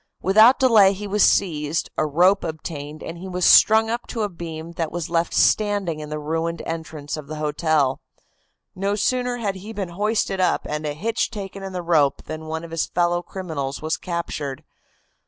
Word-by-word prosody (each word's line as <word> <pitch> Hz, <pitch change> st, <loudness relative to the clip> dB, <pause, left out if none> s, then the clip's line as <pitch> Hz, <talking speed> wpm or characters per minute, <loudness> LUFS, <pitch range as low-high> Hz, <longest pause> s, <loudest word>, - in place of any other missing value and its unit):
Without 215 Hz, +7 st, +6 dB
delay 220 Hz, -7 st, +5 dB
he 205 Hz, +2 st, -7 dB
was 205 Hz, +1 st, 0 dB
seized, 155 Hz, -4 st, +1 dB
a 155 Hz, -, 0 dB
rope 180 Hz, +7 st, +3 dB
obtained, 155 Hz, -2 st, -6 dB
and 170 Hz, +1 st, -7 dB
he 190 Hz, -, -7 dB
was 180 Hz, -1 st, -1 dB
strung 220 Hz, 0 st, +7 dB
up 235 Hz, +2 st, -3 dB
to 225 Hz, -3 st, -3 dB
a 205 Hz, -, -1 dB
beam 165 Hz, -2 st, -7 dB
that 165 Hz, -2 st, -3 dB
was 170 Hz, -1 st, -4 dB
left 170 Hz, 0 st, +1 dB
standing 205 Hz, -7 st, +2 dB
in 150 Hz, -1 st, -7 dB
the 150 Hz, -, -3 dB
ruined 165 Hz, +2 st, -3 dB
entrance 160 Hz, -2 st, -5 dB
of 150 Hz, -2 st, -8 dB
the 155 Hz, -, -6 dB
hotel. 150 Hz, -2 st, 0 dB, 0.7 s
No 195 Hz, +2 st, -1 dB
sooner 250 Hz, +3 st, 0 dB
had 200 Hz, -5 st, -2 dB
he 205 Hz, +4 st, -9 dB
been 195 Hz, -4 st, -4 dB
hoisted 205 Hz, +1 st, -1 dB
up 180 Hz, -1 st, +1 dB
and 150 Hz, 0 st, -3 dB
a 145 Hz, -, -2 dB
hitch 220 Hz, +10 st, -1 dB
taken 200 Hz, -3 st, -7 dB
in 195 Hz, 0 st, -6 dB
the 180 Hz, -1 st, -4 dB
rope 155 Hz, -5 st, +2 dB
than 155 Hz, +1 st, -7 dB
one 160 Hz, +1 st, -4 dB
of 165 Hz, -, -9 dB
his 165 Hz, -, -1 dB
fellow 175 Hz, 0 st, +1 dB
criminals 155 Hz, -8 st, -5 dB
was 160 Hz, 0 st, 0 dB
captured. 155 Hz, -5 st, -4 dB
170 Hz, 190 wpm, -22 LUFS, 155-200 Hz, 0.7 s, strung